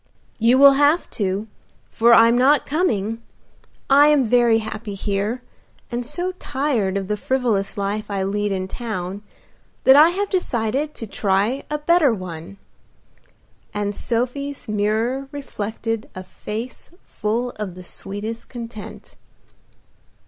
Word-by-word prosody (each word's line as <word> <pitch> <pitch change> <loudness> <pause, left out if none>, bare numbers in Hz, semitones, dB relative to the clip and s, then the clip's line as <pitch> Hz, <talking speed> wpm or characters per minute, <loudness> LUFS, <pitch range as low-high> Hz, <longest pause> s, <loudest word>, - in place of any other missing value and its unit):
"You 235 +3 +4
will 280 +1 +9
have 295 +4 +3
to, 200 +1 -2 0.4
for 235 +1 +4
I'm 230 +1 +6
not 265 +3 +4
coming. 225 - -1 0.7
I 285 +2 +6
am 295 -3 +4
very 235 0 +4
happy 215 -1 -5
here, 205 +5 -2 0.5
and 240 +1 -2
so 350 +9 -3
tired 255 -9 -1
of 195 -1 -3
the 210 - 0
frivolous 225 -3 -1
life 205 +2 -2
I 195 -1 -1
lead 205 +1 -1
in 185 -1 -2
town, 200 -4 -5 0.6
that 265 - +7
I 305 +3 +8
have 400 +4 -1
decided 280 - -1
to 225 - -6
try 205 +5 0
a 300 - -1
better 305 -2 +3
one," 185 -2 -6 1.2
and 205 0 -2
Sophie's 255 +4 -3
mirror 220 +6 0
reflected 225 -5 -4
a 185 - -6
face 220 +6 -7 0.2
full 235 +4 -2
of 200 -4 -5
the 185 - -10
sweetest 205 +5 -5
content. 230 -3 -9
225 Hz, 130 wpm, -21 LUFS, 205-265 Hz, 1.2 s, will